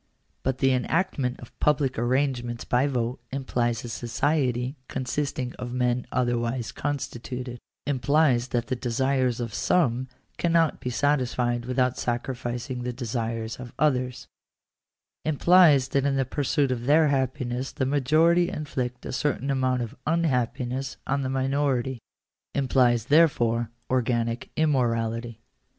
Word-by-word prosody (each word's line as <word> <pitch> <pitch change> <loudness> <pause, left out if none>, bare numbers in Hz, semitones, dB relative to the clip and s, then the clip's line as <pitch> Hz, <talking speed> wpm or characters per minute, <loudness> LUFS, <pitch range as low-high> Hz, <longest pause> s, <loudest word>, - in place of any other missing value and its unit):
But 130 0 -1
the 135 0 +3
enactment 135 -1 0
of 120 - -14
public 140 -5 +1
arrangements 120 -1 0
by 125 +3 +2
vote 125 -2 -1
implies 120 -4 -1
a - - -6
society 125 +2 0
consisting 130 -1 -2
of 125 0 -5
men 125 -1 0
otherwise 120 -1 0
constituted 125 -3 -4 0.2
— - - -63
implies 140 -2 +2
that 120 -2 -1
the 130 - -2
desires 125 0 0
of 115 -3 -4
some 130 -2 +1 0.3
cannot 165 -2 +2
be 125 - -3
satisfied 125 -3 0
without 125 0 0
sacrificing 120 0 -3
the 125 0 -2
desires 115 -2 -3
of 125 -2 -8
others 130 -4 0 0.5
— - - -63 0.2
implies 155 -3 +5
that 140 - +1
in 140 - +1
the 135 -1 +1
pursuit 140 +1 0
of 120 -1 -3
their 155 +1 +5
happiness 130 -1 -1
the 130 - -1
majority 155 +6 +3
inflict 125 -4 -4
a - - -4
certain 140 0 0
amount 130 -2 +1
of 115 - -6
f/ahap 155 -8 +1
piness 130 +2 -3
on 140 +1 0
the 130 - -2
minority 135 -1 0 0.3
— - - -29
implies, 125 -4 +3
therefore, 120 -7 +3 0.2
organic 120 -2 0
immorality. 115 -6 0
130 Hz, 135 wpm, -26 LUFS, 120-140 Hz, 0.5 s, implies